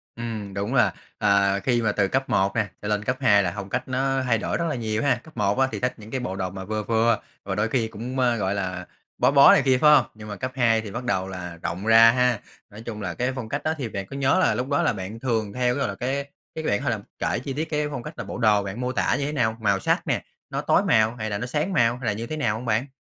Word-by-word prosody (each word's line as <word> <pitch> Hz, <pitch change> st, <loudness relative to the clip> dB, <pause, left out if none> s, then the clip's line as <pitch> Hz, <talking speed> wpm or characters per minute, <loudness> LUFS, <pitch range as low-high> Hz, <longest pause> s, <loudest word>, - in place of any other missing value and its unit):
Ừm, 110 Hz, -4 st, -5 dB
đúng 100 Hz, +5 st, -3 dB
là, 135 Hz, -, +3 dB, 0.2 s
à, 100 Hz, 0 st, +3 dB
khi 120 Hz, +2 st, +1 dB
mà 110 Hz, -2 st, +1 dB
từ 100 Hz, -1 st, +1 dB
cấp 135 Hz, +5 st, -1 dB
1 95 Hz, +2 st, +1 dB
nè 110 Hz, -2 st, +1 dB
cho 105 Hz, -, -5 dB
lên 105 Hz, 0 st, 0 dB
cấp 125 Hz, +3 st, -1 dB
2 105 Hz, -5 st, +5 dB
là 90 Hz, -, -1 dB
phong 100 Hz, -1 st, -6 dB
cách -, -, -2 dB
nó 135 Hz, +1 st, 0 dB
thay 120 Hz, -3 st, +2 dB
đổi -, -, -2 dB
rất 170 Hz, -, -1 dB
là 150 Hz, -, -2 dB
nhiều 110 Hz, -1 st, -2 dB
ha. 140 Hz, -, +3 dB
Cấp 160 Hz, -5 st, -16 dB
1 105 Hz, +2 st, +1 dB
á 135 Hz, -, +4 dB
thì -, -, -4 dB
thích 125 Hz, +1 st, 0 dB
những 110 Hz, 0 st, -12 dB
cái 130 Hz, -, -2 dB
bộ 95 Hz, -6 st, -4 dB
đồ 95 Hz, -1 st, -2 dB
mà 95 Hz, +1 st, -7 dB
vừa 110 Hz, +1 st, -2 dB
vừa 115 Hz, +1 st, +2 dB, 0.2 s
và -, -, -3 dB
đôi 105 Hz, +2 st, +1 dB
khi 115 Hz, -2 st, 0 dB
cũng, 120 Hz, +4 st, -5 dB
ơ, 120 Hz, -2 st, +3 dB
gọi 100 Hz, -2 st, -1 dB
là, 90 Hz, -2 st, -3 dB, 0.3 s
bó 125 Hz, +2 st, +3 dB
bó 140 Hz, -1 st, +8 dB
này -, -, +5 dB
kia, 130 Hz, -1 st, +4 dB
phải 150 Hz, -, +7 dB
hông? 130 Hz, -, +4 dB
Nhưng 105 Hz, 0 st, -10 dB
mà 105 Hz, -, -5 dB
cấp 130 Hz, +3 st, -4 dB
2 115 Hz, -4 st, +3 dB
thì 105 Hz, -, -8 dB
bắt 120 Hz, +4 st, -5 dB
đầu 95 Hz, -6 st, -1 dB
là 90 Hz, -2 st, -7 dB
rộng 95 Hz, +5 st, -4 dB
ra 115 Hz, 0 st, +8 dB
ha. 125 Hz, -2 st, +2 dB, 0.3 s
Nói 105 Hz, +2 st, -11 dB
chung 110 Hz, -2 st, -6 dB
là 90 Hz, -4 st, -3 dB
cái 125 Hz, +5 st, -1 dB
phong 115 Hz, -4 st, -5 dB
cách 145 Hz, -, -3 dB
đó 155 Hz, -, +1 dB
thì 130 Hz, -6 st, -4 dB
bạn 100 Hz, -2 st, -5 dB
có -, -, -7 dB
nhớ 140 Hz, +6 st, +2 dB
là 185 Hz, -, +3 dB
lúc 125 Hz, +1 st, -2 dB
đó 145 Hz, -, +2 dB
là -, -, +2 dB
bạn 100 Hz, +3 st, -6 dB
thường 110 Hz, -5 st, -1 dB
theo 125 Hz, 0 st, +1 dB
cái, -, -, -3 dB
gọi -, -, 0 dB
là, 100 Hz, -, -4 dB
cái 135 Hz, +5 st, -2 dB, 0.3 s
cái 160 Hz, -, -4 dB
bạn 105 Hz, -7 st, 0 dB
thể -, -, 0 dB
là -, -, -1 dB, 0.2 s
kể -, -, 0 dB
chi 135 Hz, +2 st, -5 dB
tiết 155 Hz, +4 st, -3 dB
cái 150 Hz, -1 st, 0 dB
phong 130 Hz, -4 st, -5 dB
cách 150 Hz, -, -7 dB
là -, -, -4 dB
bộ -, -, -6 dB
đồ 105 Hz, -4 st, +3 dB
bạn 100 Hz, +5 st, -5 dB
mô 125 Hz, -, -1 dB
tả 125 Hz, -, +1 dB
như 140 Hz, -, -1 dB
thế 150 Hz, -, -2 dB
nào? 110 Hz, -6 st, 0 dB
Màu 100 Hz, -2 st, +2 dB
sắc -, -, 0 dB
nè, -, -, 0 dB, 0.3 s
nó -, -, -2 dB
tối -, -, +3 dB
màu 110 Hz, +1 st, +3 dB
hay 110 Hz, -2 st, -4 dB
là 100 Hz, -, -2 dB
nó 115 Hz, -, -4 dB
sáng 150 Hz, +9 st, -1 dB
màu 120 Hz, -3 st, +3 dB
hay 125 Hz, -, -8 dB
là 105 Hz, -, +2 dB
như 115 Hz, +3 st, -5 dB
thế 155 Hz, -, -4 dB
nào 110 Hz, -8 st, 0 dB
hông 115 Hz, +3 st, -6 dB
bạn? 115 Hz, +4 st, 0 dB
115 Hz, 310 wpm, -24 LUFS, 105-130 Hz, 0.3 s, bó